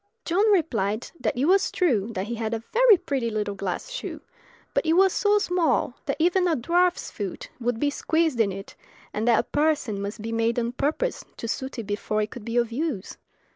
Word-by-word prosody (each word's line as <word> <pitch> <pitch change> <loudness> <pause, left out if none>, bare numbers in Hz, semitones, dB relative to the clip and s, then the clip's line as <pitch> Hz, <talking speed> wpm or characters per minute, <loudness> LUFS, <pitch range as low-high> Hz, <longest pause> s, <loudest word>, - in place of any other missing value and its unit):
John 400 +6 +3
replied 230 - 0
that 275 - -1
it 260 - +2
was 380 +3 +4
true 235 - +1
that 190 +1 -1
he 235 - -4
had 225 -1 -2
a 225 - -6
very 470 -3 +7
pretty 270 -7 -2
little 210 -2 -2
glass 195 - -4
shoe; - - -5 0.5
but - - +2
it 320 - +2
was 380 +1 +5
so 415 0 +3
small 345 - +1
that 275 - 0
even 360 +3 +3
a 330 - +2
dwarf's 350 +7 +1
foot 200 -4 -6
would 240 -1 -1
be 285 +2 +1
squeezed 320 -3 0
in 210 -3 +3
it, 195 +1 -8 0.4
and 215 +3 -1
that 235 -2 +5
a - - +1
person 290 -9 0
must 200 +3 -5
be 225 - -4
made 230 +1 +1
on 235 0 0
purpose 305 - -1
to 230 - -5
suit 265 +3 -4
it 230 - -4
before 205 +1 -2
it 210 - -5
could 240 -4 -9
be 235 +1 -2
of 235 -1 +2
use. 255 - -3
245 Hz, 210 wpm, -25 LUFS, 220-335 Hz, 0.5 s, very